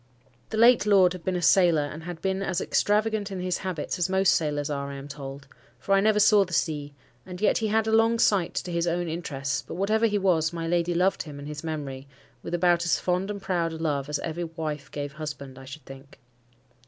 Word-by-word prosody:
The 220 - -4
late 235 -1 +5
lord 190 -3 +5
had 180 -2 -9
been 185 +1 -1
a 175 - -2
sailor, 170 -3 +5
and 155 +2 -7
had 175 -2 -7
been 190 0 0
as 190 -2 -1
extravagant 210 +1 +1
in 190 -2 -5
his 180 0 -2
habits 185 -1 -4
as 175 +1 +1
most 190 0 +3
sailors 145 -2 -1
are, 140 -1 -3
I 140 - -6
am 140 +1 -8
told,—for 140 +6 -7
I 195 - +5
never 210 +1 +3
saw 210 -1 +6
the 185 -2 -9
sea; 145 -3 -1 0.3
and 180 -1 -9
yet 210 - +2
he 220 - 0
had 220 +1 +1
a 220 - -1
long 225 +1 +4
sight 200 -6 +2
to 180 - -3
his 170 0 0
own 175 +1 -1
interests; 150 -4 -3
but - - -9
whatever 215 +5 +2
he 210 -1 0
was, 170 -5 +2
my 165 -1 -4
lady 175 0 0
loved 185 +3 +2
him 150 -3 -8
and 140 0 -8
his 150 0 -7
memory, 140 -4 -5 0.3
with 175 - -3
about 175 -1 +3
as 175 - +2
fond 180 +2 -1
and 200 -1 -5
proud 170 -3 -1
a - - -6
love 145 -3 -2
as 150 - 0
ever 170 +1 -4
wife 155 -3 -5
gave 145 -1 -5
husband, 145 -3 -7
I 135 - -11
should 135 +1 -10
think. 135 +1 -13
170 Hz, 230 wpm, -26 LUFS, 150-195 Hz, 0.3 s, saw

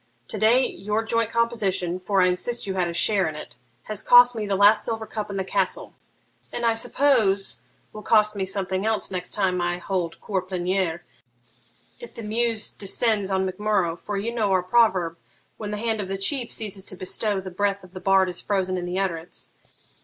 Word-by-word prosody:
To - - -1
day 240 +4 +4
your 210 +3 -2
joint 230 0 0
composition, 200 -7 -1
for 190 +1 +1
I - - +4
insist 180 +7 0
you 195 - -3
had 185 -2 0
a 170 - -4
share 195 -2 +2
in 155 - -8
it, 150 - -9 0.3
has 215 -2 -5
cost 245 0 +7
me 215 -2 -3
the 200 - 0
last 205 +2 +5
silver 225 -1 -3
cup 215 -1 -5
in 200 - -4
the 190 - -1
castle, - - -2 0.6
and 240 - -3
I 230 - +4
suppose 225 -5 +1 0.3
will 215 - -8
cost 215 0 +3
me 195 - -2
something 190 0 -1
else 220 -3 0
next 180 -1 -4
time 185 -3 0
I 175 0 -1
hold 180 -2 -3
cour 195 -3 -2
pleniere, 180 -2 -2 1.0
if 480 - -11
the 230 - -7
muse 225 +1 0
descends 205 0 -1
on 190 -1 0
Mac 185 +1 -5
Murrough; 205 -6 +1
for 205 -1 -4
you 225 +4 -3
know 215 -4 0
our 185 -1 +2
proverb, 185 -5 +2 0.4
"When 210 - -6
the 210 - -3
hand 220 0 -1
of 195 - -5
the 195 +1 -3
chief 240 +5 +1
ceases 200 -3 0
to - - 0
bestow, 195 +2 -1
the 190 0 -8
breath 200 +1 -1
of 185 - -15
the 185 - -8
bard 195 -1 +4
is 180 -1 -5
frozen 190 -2 -1
in 175 - -5
the 180 +1 -3
utterance." 175 -3 -4
195 Hz, 205 wpm, -24 LUFS, 185-220 Hz, 1.0 s, cost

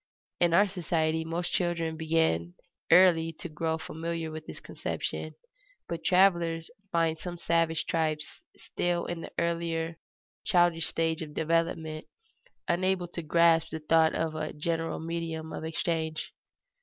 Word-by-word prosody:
In 170 -1 +4
our 205 +3 +6
society 160 -3 0
most 165 +2 -3
children 175 -3 0
begin 160 - +1 0.4
early 170 -3 +6
to 170 - -7
grow 160 0 -2
familiar 165 0 -4
with 155 0 -8
this - - -8
conception; - - -4 0.5
but 165 -1 -4
travelers 170 -3 +3 0.2
find 165 -2 +1
some 175 0 -6
savage 165 -1 +1
tribes 155 -2 0 0.3
still 175 -1 -1
in 175 -1 -4
the - - -8
earlier 165 -1 -1 0.4
childish 175 -4 +3
stage 165 +1 0
of 150 -2 -7
development, 160 -1 0 0.6
unable 185 +1 +1
to 175 - -5
grasp 165 +1 +4
the 160 - -4
thought 160 +1 +3
of 160 -1 -1
a 155 - -4
general 165 +2 -2
medium 160 -1 -4
of - - -5
exchange. 160 -1 -2
165 Hz, 135 wpm, -29 LUFS, 160-170 Hz, 0.6 s, our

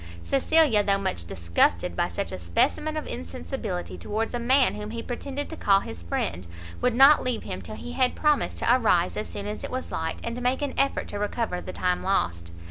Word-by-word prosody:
Cecilia, 275 -4 +4
though 200 -1 +2
much 90 - -2
disgusted 85 0 +1
by - - +1
such - - -3
a - - -5
specimen 90 - 0
of 305 - -3
insensibility 85 +1 -5
towards 220 - -2
a 240 - -1
man 255 +2 +4
whom 210 0 -6
he 230 +1 -5
pretended 275 +3 -4
to - - -5
call 195 -8 +3
his 85 - -8
friend, 85 +1 -3 0.3
would 250 -1 +2
not 275 +4 +8
leave 250 -3 -2
him - - -5
till 215 - -8
he 245 - -7
had 255 0 +1
promised 300 -2 +1
to 240 - +4
arise 180 -8 +2
as 210 - -3
soon 200 - -6
as 210 +1 -5
it - - -4
was 255 0 -4
light, 160 0 -2
and 235 +1 -4
make 255 +3 0
an 285 - -2
effort 275 - +1
to 205 - -4
recover 205 -3 -2
the - - -6
time 180 -1 0
lost. 85 - -1
215 Hz, 215 wpm, -26 LUFS, 160-255 Hz, 0.3 s, not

